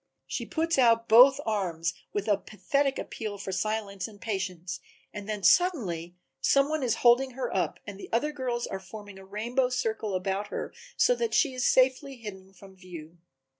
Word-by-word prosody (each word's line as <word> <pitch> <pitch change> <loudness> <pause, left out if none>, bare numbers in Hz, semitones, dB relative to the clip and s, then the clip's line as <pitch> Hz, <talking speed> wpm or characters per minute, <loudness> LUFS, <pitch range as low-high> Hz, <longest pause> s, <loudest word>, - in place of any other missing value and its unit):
She - - -4
puts 330 -2 0
out 230 -2 +4
both 250 +5 +8
arms 175 -6 -1 0.2
with 205 0 -3
a 205 - +4
pathetic 275 +7 -1
appeal 215 -2 -5
for 195 -1 -5
silence 200 -1 -2
and 210 -2 -14
patience 185 -5 -4 0.3
and 210 0 -7
then 210 -2 -3
suddenly 190 - +2 0.2
some 275 - +3
one 310 -1 -1
is 240 -3 +1
holding 250 +2 +5
her 250 -5 -3
up 185 - -1
and 200 -1 -8
the - - -10
other 265 +7 +1
girls 250 -4 -2
are 195 - -5
forming 205 +1 -11
a - - -12
rainbow 235 +6 -1
circle 220 -5 -2
about 195 +2 -2
her - - -5 0.2
so - - +5
that 470 -2 -1
she 285 -5 +3
is 255 -1 0
safely 265 +2 +2
hidden 195 -5 -10
from 195 0 -16
view. 175 -3 -11
215 Hz, 180 wpm, -28 LUFS, 190-255 Hz, 0.3 s, both